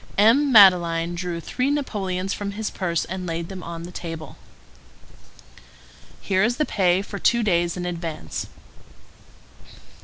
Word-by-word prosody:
M. 250 +8 +5
Madeleine 175 -5 +6
drew 175 -1 -4
three 255 - -2
napoleons 195 -10 -2
from 200 -1 -4
his 215 +1 -4
purse 170 -4 -2
and 185 0 -5
laid 165 0 -4
them 190 -2 -7
on 170 -1 -7
the 175 - -8
table. 165 -3 -7 1.9
"Here 190 0 +1
is 235 +2 +1
the 305 - +1
pay 185 -4 +1
for 200 0 -7
two 235 -1 +2
days 175 -3 +1
in 180 - -4
advance." 165 - -5
185 Hz, 140 wpm, -23 LUFS, 170-205 Hz, 1.9 s, Madeleine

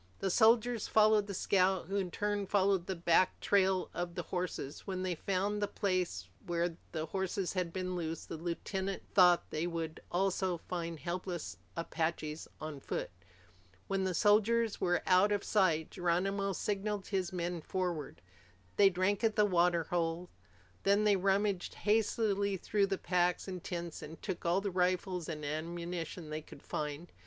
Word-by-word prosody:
The 195 - -1
soldiers 230 +2 +4
followed 215 -1 +4
the 200 - -4
scout, 190 -1 +2
who 195 +4 -2
in 190 -2 -1
turn 205 +1 -1
followed 195 -2 +2
the 190 - -2
back 170 +1 +3
trail 190 -2 +2
of 175 0 -4
the 175 - -3
horses. 180 -6 -4
When 185 -1 -2
they 185 -1 0
found 195 +4 -1
the 205 - +1
place 180 - -1 0.2
where 170 -1 -1 0.2
the 160 -1 -2
horses 190 +1 -2
had 180 -3 -1
been 185 0 -3
loosed, 165 -2 -4
the - - -5
lieutenant 190 +4 -3
thought, 180 -2 +6
they 155 +3 -1
would 165 -2 -4
also 185 0 +1
find 170 -1 -4
helpless 175 - -4 0.2
Apaches 160 -2 -2
on 155 -2 -6
foot. - - -4 0.7
When 195 -1 -1
the 185 -2 0
soldiers 220 +2 +3
were 175 0 +1
out 185 +3 +5
of 205 -1 +1
sight, 165 -7 +2
Geronimo 195 +3 0
signaled 205 +1 -2
his 190 -3 -1
men 175 -1 -3
forward. 175 - -3 0.5
They 200 -1 +7
drank 190 +3 0
at 220 -1 +2
the 210 - +5
water 175 -3 +3
hole. 170 +1 -2 0.5
Then 200 +2 +3
they 210 -1 +5
rummaged 195 0 +1
hastily 205 -2 +1
through 200 +2 +1
the 195 -1 -1
packs 180 0 +1
and 185 -2 -5
tents 170 -2 -5
and 160 +2 -9
took 180 -4 -4
all 175 +3 +3
the 200 -1 -2
rifles 180 -1 0
and 150 -2 -4
ammunition 170 +1 -4
they 155 +1 -3
could 145 - -14
find. 150 +3 -4
185 Hz, 165 wpm, -33 LUFS, 170-195 Hz, 0.7 s, They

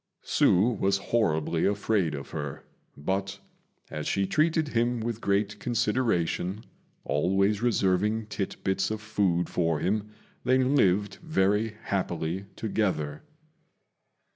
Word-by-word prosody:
Hsü 105 +5 +3
was 100 0 +2
horribly 85 -7 +1
afraid 100 -5 +1
of 70 - -8
her; 75 -2 -5 0.3
but, 95 +6 -2 0.5
as 75 - -4
she 100 - +1
treated 155 - +1
him 120 -1 +1
with 115 0 -3
great 100 +1 0
consideration, 105 -4 0 0.4
always 95 +8 +1
reserving 105 -1 +1
tit 105 -2 -4
bits 95 0 +1
of 110 0 -3
food 100 -6 0
for 85 -3 0
him, 105 +2 -1 0.3
they 130 - +3
lived 105 -7 +2
very 105 - +1
happily 90 -1 -2
together. 90 -9 -1
100 Hz, 115 wpm, -28 LUFS, 90-110 Hz, 0.5 s, Hsü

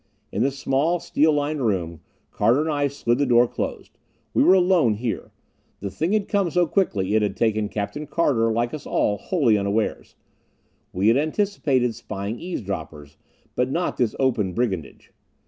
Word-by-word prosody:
In 105 - -2
the 135 - +3
small, 140 +5 0
steel 155 0 +2
lined 145 -1 -1
room, 85 -7 -1 0.3
Carter 120 +5 +2
and 160 0 -1
I 145 -1 +1
slid 130 -3 -1
the 145 - +3
door 120 0 +5
closed. - - -6 0.3
We - - +3
were 185 - +6
alone 175 - +3
here. 115 +1 -4 0.5
The 100 -1 -5
thing 165 - -1
had 210 -2 +1
come 200 -4 +1
so 175 +2 +2
quickly 105 - 0
it 110 - +3
had 100 -2 -1
taken 110 -2 +1
Captain 125 +10 -4
Carter, 130 -8 +1
like 120 +2 -1
us 155 - -7
all, 105 -1 0
wholly 125 - +2
unawares. 100 +2 -2 0.8
We 95 +4 +2
had 115 - +4
anticipated 150 - 0
spying 105 +1 -6
eavesdroppers, 95 - -6 0.4
but 125 +1 +1
not 170 +6 -1
this 120 -3 0
open 115 -8 +1
brigandage. 95 - -3
125 Hz, 165 wpm, -23 LUFS, 105-155 Hz, 0.8 s, were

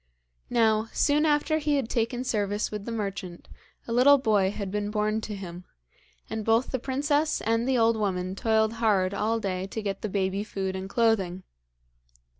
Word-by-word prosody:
Now, 220 -1 +2
soon 300 +2 +2
after 305 +1 +2
he 300 -1 +1
had 270 -5 0
taken 240 +2 -1
service 205 -3 -1
with 210 -1 -5
the 235 - -4
merchant 195 -5 -5 0.4
a - - -5
little 275 +4 +6
boy 210 -7 +2
had 200 -1 -5
been 205 0 -2
born 215 +1 0
to 215 -1 -5
him, 180 -2 -8 0.6
and 220 -1 -4
both 225 +3 +2
the 260 - -1
princess 290 +4 0
and 230 +3 0
the 260 - +2
old 230 0 +4
woman 185 -4 -1
toiled 220 +1 +1
hard 200 -4 +2
all 225 +3 0
day 190 -2 -3
to 220 - -5
get 195 -1 -3
the 215 - -3
baby 195 0 -1
food 190 -3 -4
and 190 0 -5
clothing. 195 -6 +1
215 Hz, 180 wpm, -27 LUFS, 195-235 Hz, 0.6 s, little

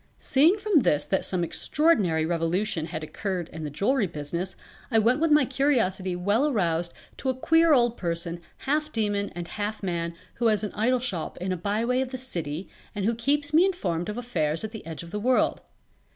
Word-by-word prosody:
Seeing 315 +9 +4
from 410 -5 +3
this 150 - +2
that 190 - 0
some 180 -2 -1
extraordinary 185 - +2
revolution 165 +1 0
had 155 -1 -5
occurred 180 +1 -3
in 160 - -7
the 150 - -3
jewelry 210 - +1
business 170 +4 -4 0.3
I 225 - +2
went 235 +6 +3
with 330 +1 +2
my 300 -2 +5
curiosity 230 -9 +1
well 205 +10 +2
aroused 170 - 0 0.3
to 265 - -2
a 260 - 0
queer 325 +5 +4
old 240 -4 +4
person 170 -1 -3 0.2
half 300 +2 0
demon 205 -4 0
and 175 -1 -5
half 210 +2 -4
man 170 -2 -2 0.2
who 235 - +2
has 215 -2 +2
an 210 - -3
idol 245 +4 +2
shop 210 -10 -3
in 185 +1 -3
a - - +1
byway 220 +8 0
of 265 - -2
the 260 - -5
City 170 - -4 0.3
and 200 -2 -1
who 230 - +2
keeps 290 +6 0
me 325 +3 +7
informed 185 - -1
of 210 - -4
affairs 165 -11 -1
at 215 - -4
the 220 - -8
Edge 165 0 -6
of 170 - -11
the 210 - -3
World. 250 +4 +2
210 Hz, 200 wpm, -26 LUFS, 170-255 Hz, 0.3 s, me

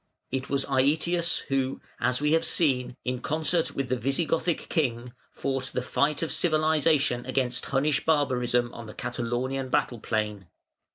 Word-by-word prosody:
It 130 0 -3
was 140 0 0
Aëtius 155 +6 +2
who, 135 -1 -1 0.2
as 125 0 +1
we 150 0 +2
have 165 +1 +3
seen, 130 -8 +2
in 125 0 -2
concert 160 +3 0
with 135 -1 -1
the 130 - +2
Visigothic 160 +6 0
king, 125 -6 -1 0.2
fought 135 -1 -2
the 125 - 0
fight 145 +4 +1
of 165 - -2
civilisation 155 -5 +2
against 130 -2 -1
Hunnish 140 +1 +1
barbarism 125 -5 +1
on 115 -1 -8
the 105 - -10
Catalaunian 125 +2 -2
battle 120 -1 0
plain. 105 -4 -2
135 Hz, 150 wpm, -27 LUFS, 125-155 Hz, 0.2 s, have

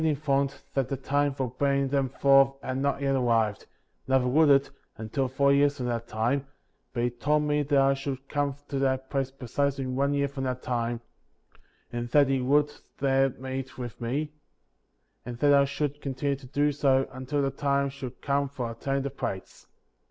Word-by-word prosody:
informed 140 -3 0
that 135 -2 0
the 135 - -2
time 145 +2 +1
for 135 -1 -2
bringing 140 -1 +2
them 135 -1 +1
forth 135 0 +4
had 130 - -3
not 140 +1 0
yet 135 0 +2
arrived, 115 -5 +1 0.4
neither 130 -1 +3
would 150 +4 +4
it, 140 0 +5 0.3
until 115 +5 -2
four 140 +2 +3
years 145 0 +3
from 125 - -3
that 115 -1 -2
time; 125 +6 -1 0.4
but 120 - -2
he 120 - +1
told 150 +6 +1
me 150 0 +1
that 145 0 +1
I 135 0 +5
should 135 -1 -5
come 145 -1 -1
to 140 - -2
that 130 -1 0
place 135 -2 0
precisely 135 +1 -2
in 130 -1 -3
one 140 +2 +1
year 140 0 +1
from 135 -1 -5
that 125 -1 -3
time, 120 -1 -2 0.9
and 120 0 -3
that 145 +1 +4
he 135 -1 +1
would 145 +3 +2 0.2
there 135 0 +3
meet 130 +1 -6
with 120 -1 -7
me, 140 +6 -2 0.9
and 120 +1 -7
that 145 +3 +4
I 140 0 +6
should 145 +1 -3
continue 140 +1 -1
to 135 -1 -13
do 145 +2 +1
so 135 -2 +2
until 130 +3 -2
the 135 - 0
time 140 0 0
should 130 -2 -8
come 140 0 +1
for 125 -4 -4
obtaining 135 +4 -2
the 140 - -3
plates. 95 -8 -6
135 Hz, 190 wpm, -27 LUFS, 130-140 Hz, 0.9 s, I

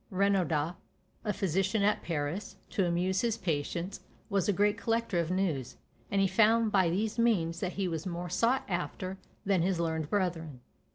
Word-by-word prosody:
Renaudot, 180 -5 +1 0.5
a 210 - 0
physician 195 +2 0
at 210 +1 +2
Paris, 160 +4 -3 0.2
to 195 -6 +1
amuse 180 +2 +1
his 230 -2 0
patients 170 0 -2 0.3
was 200 -1 +1
a - - +6
great 205 +2 +2
collector 225 -5 0
of 170 -1 0
news; 180 -9 -1 0.3
and 200 - +1
he 195 - +4
found 220 +3 +4
by 190 -4 +4
these 210 +6 -1
means 175 -8 +2
that 185 -1 -2
he 195 -2 -1
was 165 0 -3
more 175 0 -4
sought 245 +9 +2
after 185 +2 -3 0.3
than 195 -3 +3
his 180 0 +1
learned 160 -2 -1
brethren. 165 -9 -1
185 Hz, 170 wpm, -31 LUFS, 170-205 Hz, 0.5 s, a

